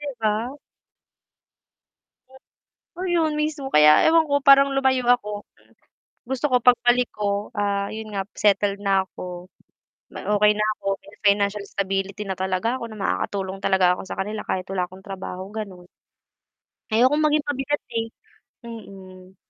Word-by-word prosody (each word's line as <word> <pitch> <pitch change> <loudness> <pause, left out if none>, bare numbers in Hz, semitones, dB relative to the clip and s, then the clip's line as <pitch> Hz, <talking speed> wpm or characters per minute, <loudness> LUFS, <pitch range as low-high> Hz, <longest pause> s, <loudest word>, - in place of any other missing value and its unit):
'Di 295 - -7
ba? 220 +4 0 2.5
Ayun, 345 -4 +1
mismo. 295 -3 -3
Kaya 150 0 +6
ewan 320 -1 +4
ko 285 0 +1
parang 275 0 +7
lumayo 265 -1 +2
ako. 210 -4 0 0.8
Gusto 265 +3 -2
ko 250 - +4
pagbalik 245 0 +4
ko, 205 0 -2
ah, 200 -1 -1
yun 220 0 -7
nga 195 -1 -2
settled 200 0 +2
na 195 -1 +2
ako, 180 -1 -9 0.7
na - - -8
okey 210 +1 +5
na 210 - +1
ako, 200 - -15 0.2
may 200 - -16
financial 200 0 +2
stability 195 +1 -3
na 190 - -1
talaga 190 +6 -1
ako, - - -5
na - - -9
makakatulong 195 -1 -2
talaga 190 -2 +3
ako - - -7
sa - - -5
kanila 210 +2 -3
kahit 185 - -1
wala 185 -2 0
akong 190 +1 -15
trabaho, 190 -1 -6
ganon. 190 -5 -7 1.0
Ayokong 260 +7 +4
maging 300 -1 +2
pabigat 285 +1 -1
eh, 225 0 -1 0.6
mm. 190 -5 -11
210 Hz, 140 wpm, -23 LUFS, 195-255 Hz, 2.5 s, parang